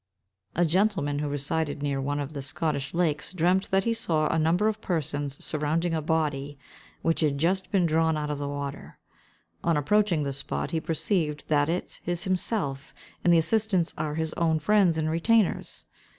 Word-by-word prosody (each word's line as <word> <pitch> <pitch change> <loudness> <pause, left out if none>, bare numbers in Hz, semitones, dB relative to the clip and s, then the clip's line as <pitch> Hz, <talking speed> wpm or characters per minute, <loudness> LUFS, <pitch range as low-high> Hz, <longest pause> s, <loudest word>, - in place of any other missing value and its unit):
A 175 - +3
gentleman, 170 -5 +1
who 150 0 -2
resided 145 +1 -2
near 140 -2 -1
one 145 +2 -1
of 145 +1 -4
the 140 - -4
Scottish 140 +1 -2
lakes, 165 -1 0
dreamed 185 +2 +2
that 195 0 +1
he 230 - +1
saw 165 -9 0
a 165 - +1
number 170 +6 +2
of 215 0 -1
persons 145 -4 -3
surrounding 160 +3 -1
a 160 - 0
body, 145 -3 -1 0.5
which 165 - +1
had 150 -3 +1
just 185 +5 0
been 190 -4 +3
drawn 160 0 +2
out 150 -1 -2
of 145 - -3
the 140 0 -3
water. 140 -1 -6 0.7
On 170 -2 +2
approaching 175 +1 +2
the 140 -1 -2
spot, 140 - -4
he 160 - -1
perceives 160 -2 -1
that 145 0 +1
it 175 +2 -3
is 175 -1 -1
himself, 180 -7 -2 0.3
and 175 - +4
the 170 - +6
assistants 190 0 +2
are 150 -1 -3
his 160 0 -2
own 165 -2 +1
friends 180 +1 +3
and 155 -1 0
retainers. 190 +6 +1
160 Hz, 180 wpm, -27 LUFS, 145-180 Hz, 0.7 s, the